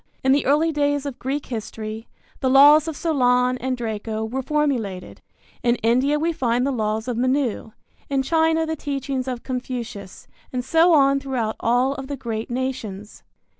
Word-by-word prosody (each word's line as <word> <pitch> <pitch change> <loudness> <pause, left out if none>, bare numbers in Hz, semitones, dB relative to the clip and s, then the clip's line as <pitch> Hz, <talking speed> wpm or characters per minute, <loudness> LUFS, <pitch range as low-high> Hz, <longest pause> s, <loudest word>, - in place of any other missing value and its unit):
In 265 - +3
the 280 0 +2
early 305 +4 +3
days 290 -1 0
of 275 -3 -6
Greek 275 +3 -3
history, 220 -1 -6 0.3
the 260 - +1
laws 290 +4 +7
of 320 -3 -4
Solon 250 -5 +2
and 255 0 -2
Draco 220 -1 -3
were 255 +4 -3
formulated. 260 -10 -2 0.4
In 240 0 +2
India 255 +6 +3
we 330 +2 0
find 245 -3 0
the 280 - 0
laws 220 -1 -2
of 245 -2 -2
Manu, 255 -2 0 0.4
in 275 -1 +1
China 320 +2 +2
the 320 0 -2
teachings 275 -3 -3
of 250 -2 -4
Confucius, 245 -6 -6 0.2
and 250 -1 -3
so 330 +5 +4
on 275 -3 +4
throughout 250 -5 -2
all 245 +3 +2
of 270 -1 -7
the 285 0 -5
great 230 -3 -4
nations. 235 -5 -5
260 Hz, 170 wpm, -22 LUFS, 235-285 Hz, 0.4 s, laws